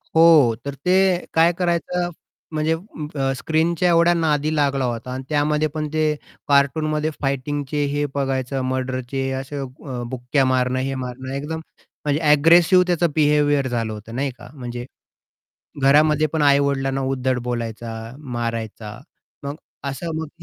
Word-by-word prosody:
हो. 160 -8 +6
तर 140 - -3
ते 185 -1 +3
काय 165 +1 +5
करायचं 175 0 -1 0.4
म्हणजे 155 +1 +1
अं, 150 -6 -3
स्क्रीनच्या 160 +5 +1
एवढ्या 170 0 +5
नादी 155 -2 +1
लागला 140 -3 +1
होता 120 0 -4
आणि 130 - -5
त्यामध्ये 150 +1 +1
पण 155 -1 -2
ते 155 - +1 0.4
कार्टूनमध्ये 150 +2 +2
फायटिंगचे 145 +1 -1
हे 145 0 0
बघायचं 135 -1 -1
मर्डरचे, 130 +1 -2
असे 135 +2 -6
अ, 135 - -3 0.4
बुक्क्या 130 +2 0
मारणं 130 0 +1
हे 135 +1 -2
मारणं. 130 0 -6
एकदम 150 +3 -4 0.5
म्हणजे 145 +1 +1
एग्रेसिव्ह 170 +5 +6
त्याचं 175 -1 +2
बिहेवियर 145 -2 +3
झालं 115 -3 -2
होतं, 110 +2 -9
नाही 135 +1 -1
का? 120 - -12
म्हणजे 120 -3 -6 1.0
घरामध्ये 150 +2 +5
पण 160 -2 +1
आई-वडिलांना 140 -1 +2
उद्धट 130 -1 0
बोलायचा, 115 -1 -4 0.3
मारायचा 115 -5 -5 0.5
मग 140 +2 -4 0.3
असं 140 +5 -5
मग 160 -1 -4
140 Hz, 135 wpm, -22 LUFS, 130-155 Hz, 1.0 s, हो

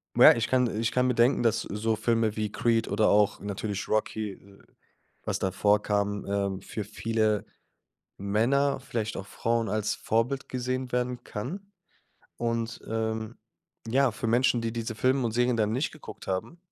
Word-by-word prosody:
ja, - - +9
ich 115 -1 -1
kann 125 -1 +3
äh, 105 - -4
ich 115 - 0
kann 125 0 +3
mir 125 - +1
denken, 120 +1 +3
dass 115 0 +2
so 110 +2 -1
Filme 110 -1 +1
wie 105 -1 -2
Creed 115 -1 +1
oder 105 +1 +2
auch 105 -1 +3
natürlich 100 0 -3
Rocky 110 -1 0
äh, 100 +1 -16 0.6
was - - -2
da 95 - 0
vorkam, 100 +1 +1
ähm, 100 -1 -1
für 105 +1 -5
viele 110 0 0 0.7
Männer, 125 +8 +2
vielleicht 115 -5 -3
auch 100 - -6
Frauen 115 0 -1
als 110 -1 0
Vorbild 120 +5 -1
gesehen 130 0 -2
werden 125 0 -1
kann 190 - -6 0.7
und, 115 0 -2
ähm, 110 0 -2 0.5
ja, 135 +1 +3
für 115 - -4
Menschen, 120 +1 +3
die 115 -1 -2
diese 115 -1 -3
Filme 130 +3 +2
und 115 - 0
Serien 120 0 +2
dann 110 -1 +1
nicht 130 +6 0
geguckt 155 - -11
haben 95 - -3
115 Hz, 170 wpm, -28 LUFS, 105-125 Hz, 0.7 s, ja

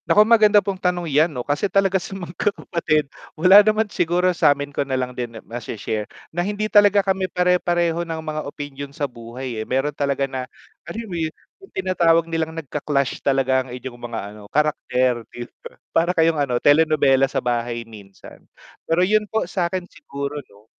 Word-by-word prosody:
Nako, 210 +1 +6
maganda 215 -3 +5
pong 190 -2 -3
tanong 180 -1 0
yan 155 +2 +3
'no 125 -6 -6
kasi 145 +8 0
talaga 195 -1 +2
sa 195 - -7
magkakapatid 170 -4 -1 0.3
wala 185 +5 +8
naman 215 +1 +2
siguro 180 -2 +1
samin 145 -3 +2
ko - - -1
nalang 130 -2 -2
din 120 -2 -5
ma-she 115 0 -6
share 105 0 -3 0.2
na 175 - 0
hindi 205 +3 -2
talaga 205 -2 +5
kami 190 -1 0
pare-pareho 175 -2 +1
ng 165 -1 -4
mga 155 -1 -4
opinyon 145 -1 -7
sa 145 - 0
buhay 120 -1 -7
eh, - - -5
meron 135 +3 0
talaga 140 -1 0
na, 130 -2 -5 0.4
alam 230 +1 -5
mo 195 - -8
yun, 160 - 0 0.3
yung 390 - -15
tinatawag 170 -3 +3
nilang 165 -1 -3
nagka-clash 140 -3 -2
talaga 135 -1 +2
ang 130 - -10
inyong 125 -1 -9
mga 120 -1 -5
ano 105 - -13
karakter 130 -5 +1
'di 120 - -7 0.2
ba? - - -11 0.2
para 170 +2 +3
kayong 165 -1 +3
ano, 125 -4 0
telenovela 145 -2 +4
sa - - -4
bahay 120 -1 -2
minsan. 100 -4 -14 0.5
Pero 170 +3 +3
yun 210 +1 +1
po 220 - 0
sakin 180 -1 -2
siguro 140 -4 -7 0.2
'no 100 +1 -21
155 Hz, 175 wpm, -22 LUFS, 130-180 Hz, 0.5 s, wala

